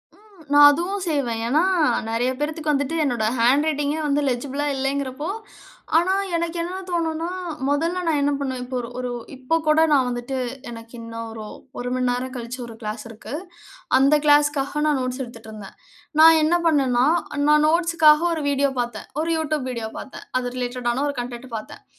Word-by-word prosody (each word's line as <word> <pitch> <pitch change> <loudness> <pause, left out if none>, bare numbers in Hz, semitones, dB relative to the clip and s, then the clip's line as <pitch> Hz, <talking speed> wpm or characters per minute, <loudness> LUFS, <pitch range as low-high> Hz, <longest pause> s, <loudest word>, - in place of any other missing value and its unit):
ம். 415 -4 -21
நான் 290 0 +9
அதுவும் 360 +6 -2
செய்வேன், 245 -7 -1
ஏன்னா 295 +7 +3 0.5
நெறைய 240 +3 +1
பேரத்துக்கு 305 0 -1
வந்துட்டு 285 +3 -1
என்னோட 240 -5 0
ஹேண்ட் 260 +6 +4
ரைட்டிங்கே 295 0 0
வந்து 290 0 +1
லெஜிபுளா 270 +3 -2
இல்லைங்கிறப்போ. 275 +3 -2 0.7
ஆனா 355 +3 +3 0.2
எனக்கு 335 0 -2
என்ன 355 +2 -4
தோணுன்னா, 330 -1 -1 0.4
மொதல்ல 330 +6 0
நான் 310 -3 +2
என்ன 285 +1 +2
பண்ணுவேன், 260 -3 -3
இப்ப 255 +1 -6
ஒரு 235 -1 -5
ஒரு 250 -1 -3 0.2
இப்ப 260 +5 0
கூட 305 +1 +5
நான் 270 -3 +4
வந்துட்டு 245 +2 -4 0.3
எனக்கு 230 0 -10
இன்னும் 230 0 -7
ஒரு 220 -1 -7 0.3
ஒரு 245 0 -3
மண்நேரம் 255 0 -1
கழிச்சு 245 +1 -6
ஒரு 230 - -10
கிளாஸ் 215 0 -5
இருக்கு. 225 +2 -10 0.6
அந்த 275 +3 +5
கிளாஸ்க்காக 290 -1 +3
நான் 295 -3 +2
நோட்ஸ் 255 +1 -3
எடுத்துட்ருந்தேன். 220 -4 -10 0.5
நான் 325 0 +8
என்ன 335 +3 +3
பண்ணேன்னா, 260 -5 +3 0.4
நான் 300 0 +5
நோட்ஸுக்காக 325 -2 +4
ஒரு 315 -2 -3
வீடியோ 280 0 +1
பாத்தேன், 240 -3 -6
ஒரு 330 +1 -1
யூடியூப் 305 -4 -2
வீடியோ 230 -3 -4
பார்த்தேன். 265 - -10
அது 245 -1 -4
ரிலேட்ட 250 0 -3
டான 260 +4 0
ஒரு 285 - -4
கன்டென்ட் 245 +1 -8
பாத்தேன். 215 - -10
275 Hz, 165 wpm, -23 LUFS, 245-310 Hz, 0.7 s, நான்